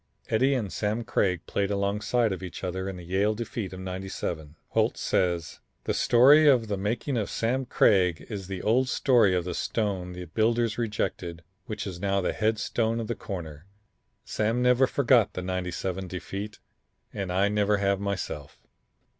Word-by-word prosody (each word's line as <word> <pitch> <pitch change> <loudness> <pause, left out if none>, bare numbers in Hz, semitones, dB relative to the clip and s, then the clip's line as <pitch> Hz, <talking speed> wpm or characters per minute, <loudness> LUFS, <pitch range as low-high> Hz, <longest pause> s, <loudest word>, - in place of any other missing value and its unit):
Eddie 130 +5 +3
and 105 -7 -3
Sam 110 +3 -1
Craig 95 -4 0
played 100 -1 -1
alongside 105 +3 0
of 95 -1 -4
each 90 0 -7
other 95 +1 -3
in 95 - -6
the 90 - -9
Yale 100 +5 +1
defeat 110 -3 -4
of 95 - -8
'97. 90 -5 -5
Holt - - +1
says: 85 -3 0 0.2
"The - - -1
story 140 +6 +6
of 125 -5 +5
the 100 - 0
making 115 +7 -2
of 105 - -1
Sam 125 +3 -1
Craig 90 -7 +3
is 100 -4 -6
the 95 -1 -5
old 125 +4 +2
story 115 -10 +4
of 90 -1 -1
the 90 - -3
stone 95 -3 -2
the 90 0 -7
builders 115 +5 +1
rejected, 90 -6 -3 0.2
which 105 -2 -4
is 90 -3 -6
now 100 +1 +1
the 95 - -1
head 110 0 +1
stone 115 +2 -1
of 115 - -3
the - - +1
corner. 85 -7 -7 0.6
Sam 115 +3 0
never 125 +1 +4
forgot 125 -6 +3
the 90 - -4
'97 90 0 -3
defeat 100 +3 -6 0.6
and 95 -2 -3
I 95 +2 +3
never 105 0 +2
have 100 -1 +1
myself. 95 -8 -4
100 Hz, 170 wpm, -27 LUFS, 90-115 Hz, 0.6 s, story